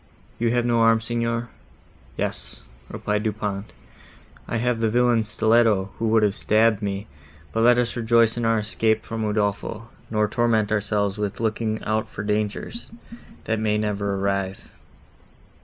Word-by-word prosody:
You 115 0 +2
have 120 0 +1
no 120 -1 +2
arms, 115 0 +4
Signor?" 115 0 -1 0.7
"Yes," - - -3 0.3
replied 105 0 -2
Du 110 0 0
Pont, 105 0 -4 0.8
"I 115 - -1
have 120 0 0
the 115 -1 +2
villain's 120 -1 +2
stilletto, 110 -3 +3
who 115 - 0
would 110 0 +4
have 105 -2 +3
stabbed 110 +1 +3
me—but 80 -2 -6
let 120 +1 +6
us 125 -1 0
rejoice 115 -1 +3
in 120 - -3
our 115 0 +3
escape 110 +1 0
from 115 -1 -4
Udolpho, 105 +2 -2 0.2
nor 105 -1 +1
torment 110 -2 +1
ourselves 105 -1 0
with 105 -1 -3
looking 110 -1 -1
out 110 0 -1
for 105 - -6
dangers, 105 - -2 0.5
that 110 -1 -1
may 105 -1 +1
never 100 -2 -1
arrive." 100 0 -2
110 Hz, 150 wpm, -24 LUFS, 105-115 Hz, 0.8 s, let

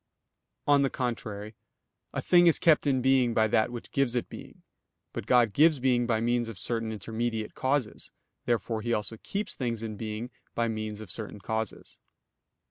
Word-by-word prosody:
On 145 -1 +5
the 135 - +2
contrary, 110 -4 -4 0.6
A - - -3
thing 175 -1 +5
is 165 - +6
kept 155 -3 +4
in 130 -3 +2
being 130 -3 +3
by 110 0 +4
that 110 +2 +2
which 120 -1 -8
gives 135 -3 +1
it 120 - -1
being. - - -11 0.5
But - - -5
God 120 -4 +4
gives 155 +5 +5
being 125 -2 +2
by 115 -2 +1
means 120 0 0
of 110 - -8
certain 115 0 0
intermediate 110 +1 -3
causes. 130 -4 -1 0.4
Therefore 115 -2 0
He 120 +1 -1
also 110 +1 -2
keeps 200 - -3
things 115 -3 -3
in 110 -2 -5
being 110 +3 -5 0.2
by 115 0 +1
means 110 -1 -4
of 110 - -8
certain 110 -2 +1
causes. 110 +1 -4
115 Hz, 175 wpm, -28 LUFS, 110-130 Hz, 0.6 s, is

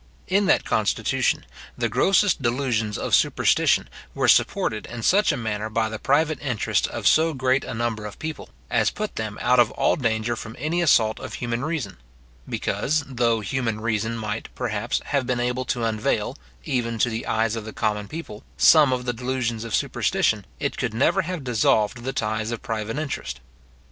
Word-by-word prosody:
In 195 +2 +2
that - - +3
constitution, - - 0 0.3
the - - +1
grossest 195 -4 +3
delusions 120 -4 0
of - - -4
superstition - - +3 0.3
were - - +1
supported 110 -1 +2
in 120 -2 -7
such 200 - +4
a 145 - -2
manner 110 -2 -3
by 110 0 0
the 110 0 -6
private 155 +1 +1
interests 125 -7 0
of - - -6
so 160 0 +4
great 130 0 +1
a - - -5
number 110 -2 -2
of 105 - -10
people, 155 - -6 0.2
as - - +3
put 215 0 -5
them 110 -1 -4
out 125 0 +4
of 120 -2 +5
all - - +1
danger 115 -2 0
from 115 0 -8
any 160 +6 -1
assault 110 -9 +3
of - - -7
human 120 +1 -3
reason; 150 - -3 0.5
because, 155 +1 0
though 120 -4 +1
human 115 -1 -2
reason 115 0 -1
might, 110 0 -4
perhaps, 110 -5 -2
have 140 -4 -1
been 125 -1 0
able 125 +1 -1
to 120 -1 -2
unveil, 110 -1 -1 0.3
even 115 - -1
to 120 +2 +2
the 110 +1 -4
eyes 110 0 +1
of 115 - -4
the 110 - -7
common 105 -2 -1
people, 150 -9 -8
some 150 -4 +6
of 125 -1 -1
the 120 - -1
delusions 120 -2 -2
of 115 -3 -2
superstition, - - 0
it - - -2
could 115 -3 -2
never 140 +10 +3
have 180 -3 -5
dissolved 110 -2 +2
the 130 - -2
ties 110 -2 -2
of 120 -1 -5
private 110 +2 -3
interest. 140 - -4
120 Hz, 185 wpm, -24 LUFS, 110-135 Hz, 0.5 s, some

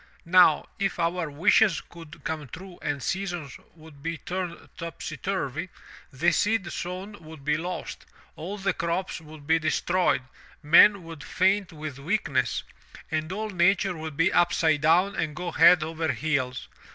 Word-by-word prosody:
Now, 170 -3 +5
if 195 -1 -1
our 170 -1 -1
wishes 170 +5 +3
could 165 -3 -13
come 155 -3 -4
true 180 +6 -11
the 145 -1 -2
seasons 175 -4 -4 0.2
would 155 -3 -15
be 165 +2 -3
turned 180 0 -5
topsy 165 -2 -6
turvy, 180 -1 -3 0.4
the 165 +7 +2
seed 205 -1 +1
sown 185 +2 -6
would 155 -3 -12
be 150 0 +2
lost, 175 +4 -5 0.3
all 190 +6 -6
the 195 -1 0
crops 170 +2 -2
would 155 -2 -13
be 160 +2 +3
destroyed, 165 -2 +1 0.4
men 180 +6 +7
would 165 -3 -9
faint 190 0 +1
with 155 -4 -7
weakness, 185 +10 0 0.5
and 155 +1 -2
all 215 +2 -3
nature 190 +1 +2
would 155 -2 -7
be 165 +3 +3
upside 160 -3 +3
down 175 +5 +3
and 155 -2 -2
go 180 0 -4
head 170 0 +6
over 160 0 -2
heels. 130 -5 -2
165 Hz, 150 wpm, -26 LUFS, 155-185 Hz, 0.5 s, men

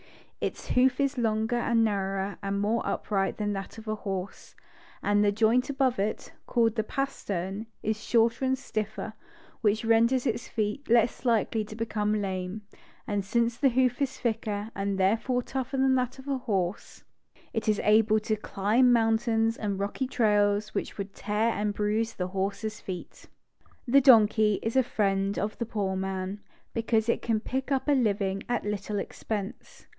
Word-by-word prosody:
Its - - -4
hoof 255 +1 +3
is 275 -1 0
longer 220 +1 +1
and 235 -1 +2
nar 195 -3 0
rower, 195 +1 -3
and 200 0 -2
more 215 +3 +1
upright 195 -2 -1
than 210 -1 -1
that 195 +1 -6
of 220 - -10
the 215 0 -2
horse; 195 -2 -6 0.5
and 205 0 +3
the 205 - +4
Joint 225 +5 +2
above 265 -5 +1
it, 210 +2 -2
called 230 -2 +2
the 220 -1 0
pastern, 210 -6 -3 0.2
is 215 0 -2
shorter 230 +2 +2
and 265 0 +2
stiffer, 215 -5 -4 0.5
which 220 +1 +1
renders 230 +3 +3
its 245 - -1
feet 215 +5 -3
less 235 +1 +3
likely 225 -2 +2
to 215 - -9
become 215 -1 -1
lame; 190 +1 -3 0.4
and 205 -1 -1
since 235 +4 +1
the 275 - +4
hoof 255 +1 +1
is 275 -2 -1
thicker 220 -2 -2
and 195 0 -2
therefore 225 +6 +1
tougher 265 +1 -3
than 265 0 +3
that 255 0 0
of 265 - -12
the 275 -2 -1
horse, 195 -7 -3 0.5
it 225 -1 -1
is 210 - +2
able 215 0 +4
to 215 0 0
climb 215 +4 +2
mountains 225 0 +2
änd 200 -2 -2
rocky 205 +6 -2
trails 210 -3 +2
which - - -3
would 200 -1 -5
tear 215 +2 0
and 210 -2 -1
bruise 215 +2 0
the 180 0 -3
horse's 200 +3 -3
feet. 180 -2 -8 0.6
The 275 +3 +6
donkey 215 -5 +6
is 225 +2 -2
a 265 - +6
friend 195 -4 0
of 210 +1 -3
the 235 - -2
poor 200 -4 -1
man, 190 +1 -3 0.3
because 225 -1 +1
it 235 - +1
can 225 -2 0
pick 265 +5 -3
up 270 +1 0
a - - +4
living 200 -7 +1
at 240 -3 -1
little 210 0 -3
expense. 200 0 -5
220 Hz, 170 wpm, -28 LUFS, 205-235 Hz, 0.6 s, The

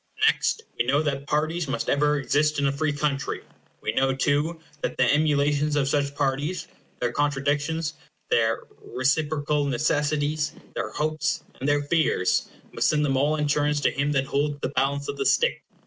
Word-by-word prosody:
Next, 450 0 +2 0.2
we - - +2
know 140 +4 +3
that 140 -1 -2
parties 155 +2 0
must 125 -4 -2
ever 150 +1 +2
exist 150 +2 +1
in 145 - +1
a 140 - +3
free 150 +2 0
country. 145 -1 -2 0.4
We - - -1
know, 135 +3 +1
too, 145 +5 0 0.2
that - - -3
the - - +4
emulations 145 +1 +2
of 140 -2 +2
such 140 0 0
parties—their 140 -2 -3
contradictions, 145 +2 0 0.4
their 115 -1 +2 0.2
reciprocal 145 +3 0
necessities, 150 +2 0 0.2
their - - -3
hopes, 155 0 -1 0.2
and 135 - -1
their 145 0 +2
fears—must 145 - 0
send 150 -1 +2
them 135 -2 +1
all 145 +3 +2
in 150 - -1
their - - -1
turns 150 0 +2
to - - +3
him 140 +1 0
that 135 -1 +1
holds 145 +1 -1
the - - -1
balance 140 +1 0
of - - -4
the 410 - -1
State. 485 +1 +2
145 Hz, 170 wpm, -25 LUFS, 140-150 Hz, 0.4 s, the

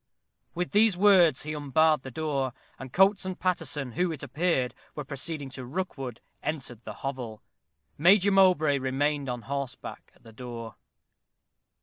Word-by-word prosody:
With 180 +1 -2
these 210 -2 +4
words 180 -7 +5
he 155 +1 -4
unbarred 150 +1 +2
the 130 - -8
door, 135 -2 -2 0.3
and 130 -1 -8
Coates 195 +4 +4
and 185 -1 -5
Paterson, 155 -7 -2
who, 180 +7 0
it 155 - -7
appeared, 150 -8 0 0.2
were 150 - -4
proceeding 140 +1 -4
to 130 0 -7
Rookwood, 135 -4 -5 0.2
entered 125 -6 -4
the - - -6
hovel. 125 -6 -5 0.6
Major 195 +5 +5
Mowbray 180 -7 +4
remained 135 +2 0
on 125 -1 -4
horseback 140 -1 -6
at - - -26
the 115 - -14
door. 115 -1 -7
145 Hz, 145 wpm, -28 LUFS, 130-175 Hz, 0.6 s, words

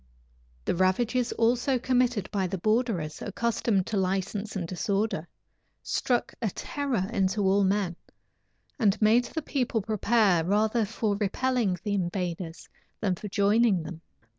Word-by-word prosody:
The - - +1
ravages 230 +7 +1
also 245 +3 +2
committed 245 -5 +1
by 195 -3 0
the 190 - -3
borderers, 215 -6 0
accustomed 215 -2 0
to 215 - -2
license 195 +3 -1
and 180 -4 -2
disorder, 195 -1 -1 0.6
struck 245 -2 0
a 225 - +1
terror 255 -3 -2
into 200 0 +1
all 195 +1 +3
men, 190 -2 +1 0.8
and 215 -4 +3
made 225 +3 +4
the 320 +4 -5
people 250 -5 0
prepare 210 -4 +2
rather 215 +5 +2
for 215 0 -1
repelling 215 -1 0
the 205 - -1
invaders 175 -2 -3 0.3
than 195 -4 +1
for 195 +4 -6
joining 205 -1 +3
them. 165 0 -8
205 Hz, 135 wpm, -27 LUFS, 190-235 Hz, 0.8 s, made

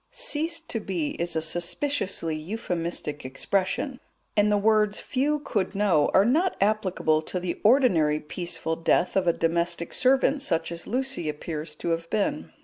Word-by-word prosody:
"Ceased 330 -8 -1
to 225 - -2
be" 180 -7 -2
is 170 0 -1
a 160 - 0
suspiciously 175 - -2
euphemistic 170 -4 -4
expression, 190 - -1 0.4
and 210 0 +4
the 205 - +4
words 210 0 +3
"few 285 +3 0
could 195 -7 -2
know" 195 -7 +3
are 195 - +5
not 325 +10 +2
applicable 190 -6 +1
to 180 +3 -4
the 175 -1 -4
ordinary 185 - +4
peaceful 165 +1 -4
death 170 +2 +1
of 190 -2 +2
a - - +6
domestic 170 +1 -1
servant 270 +2 +3
such 170 - -1
as 170 0 -6
Lucy 260 - -1
appears 150 0 -5
to 170 - -4
have 165 0 -2
been. 295 +8 -1
185 Hz, 155 wpm, -26 LUFS, 165-245 Hz, 0.4 s, a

